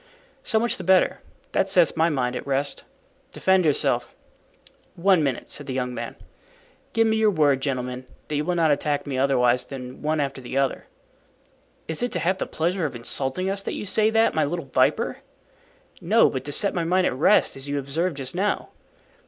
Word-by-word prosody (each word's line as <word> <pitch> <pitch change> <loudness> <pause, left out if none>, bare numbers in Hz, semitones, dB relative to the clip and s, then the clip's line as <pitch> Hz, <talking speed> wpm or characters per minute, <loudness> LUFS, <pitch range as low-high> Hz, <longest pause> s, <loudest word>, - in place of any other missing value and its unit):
"So 220 - 0
much 235 +1 +1
the 190 - -7
better; 185 +1 +3 0.3
that 190 - +1
sets 180 -4 +4
my 165 +1 +3
mind 125 -5 -1
at - - -6
rest. 140 +1 -1 0.5
Defend 190 -3 +2
yourself." 145 - +1 0.8
"One 185 0 +3
minute," 135 -4 -2
said - - -7
the 130 - -4
young 125 -1 -2
man. - - -6 0.8
"Give 225 0 +3
me 220 0 +2
your 220 -1 +4
word, 145 -7 +2
gentlemen, 125 -2 -3 0.2
that 150 - -3
you 145 - 0
will 180 +3 -1
not 165 -3 +3
attack 145 0 0
me 135 -3 -3
otherwise 125 -2 +3
than 130 -2 -9
one 155 +1 0
after 135 -2 -2
the 125 +2 -5
other." 135 -1 -1 1.0
"Is 160 - -2
it 245 - -1
to - - -1
have 185 +2 0
the - - -2
pleasure 170 +2 -1
of 135 - -9
insulting 135 +8 -3
us 195 +1 -1
that - - -4
you - - -5
say 215 +2 +2
that, 225 0 +3
my 155 - +2
little 165 +2 -3
viper?" 135 - +1 0.8
"No, 220 +7 +4
but 130 - -4
to 145 - -3
set 200 +7 +3
my 175 - -1
mind 180 +2 +2
at - - +1
rest, 160 +10 +3
as 135 +1 -7
you 145 - -1
observed 145 +4 -2
just 130 -1 -5
now." 200 +3 -1
150 Hz, 200 wpm, -24 LUFS, 135-185 Hz, 1.0 s, sets